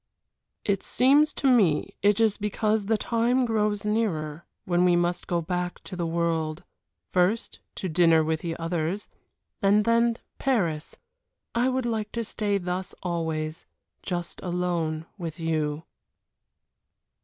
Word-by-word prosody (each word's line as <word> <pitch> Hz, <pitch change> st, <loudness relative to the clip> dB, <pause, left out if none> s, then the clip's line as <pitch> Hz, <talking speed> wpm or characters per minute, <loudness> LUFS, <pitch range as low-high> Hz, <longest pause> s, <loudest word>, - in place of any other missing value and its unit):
"It 200 Hz, -2 st, +1 dB
seems 285 Hz, +4 st, +4 dB
to 275 Hz, -, 0 dB
me 210 Hz, -, +3 dB
it 205 Hz, +1 st, +4 dB
is 220 Hz, -2 st, +3 dB
because 210 Hz, 0 st, 0 dB
the 220 Hz, 0 st, +3 dB
time 240 Hz, +3 st, +1 dB
grows 210 Hz, -2 st, 0 dB
nearer 170 Hz, -8 st, -1 dB, 0.2 s
when 175 Hz, 0 st, +2 dB
we 180 Hz, -1 st, +5 dB
must 175 Hz, 0 st, 0 dB
go 170 Hz, -1 st, 0 dB
back 180 Hz, +1 st, -2 dB
to 190 Hz, -, -7 dB
the 170 Hz, -2 st, -2 dB
world. 165 Hz, -1 st, -1 dB, 0.5 s
First 185 Hz, +6 st, +1 dB, 0.2 s
to 190 Hz, -, -3 dB
dinner 165 Hz, -1 st, +4 dB
with 160 Hz, 0 st, 0 dB
the 165 Hz, 0 st, -4 dB
others, 165 Hz, +3 st, -2 dB, 0.5 s
and 205 Hz, +1 st, +4 dB
then 230 Hz, 0 st, +3 dB, 0.2 s
Paris. 175 Hz, -, 0 dB, 0.6 s
I 245 Hz, +2 st, +2 dB
would 260 Hz, -1 st, -1 dB
like 220 Hz, -3 st, -2 dB
to 235 Hz, -, -1 dB
stay 205 Hz, -2 st, -1 dB
thus 180 Hz, 0 st, -4 dB
always 160 Hz, -3 st, -3 dB, 0.3 s
just 175 Hz, -2 st, -4 dB
alone 175 Hz, -3 st, -1 dB
with 165 Hz, -2 st, -5 dB
you." 155 Hz, -2 st, -1 dB
180 Hz, 135 wpm, -26 LUFS, 165-220 Hz, 0.6 s, we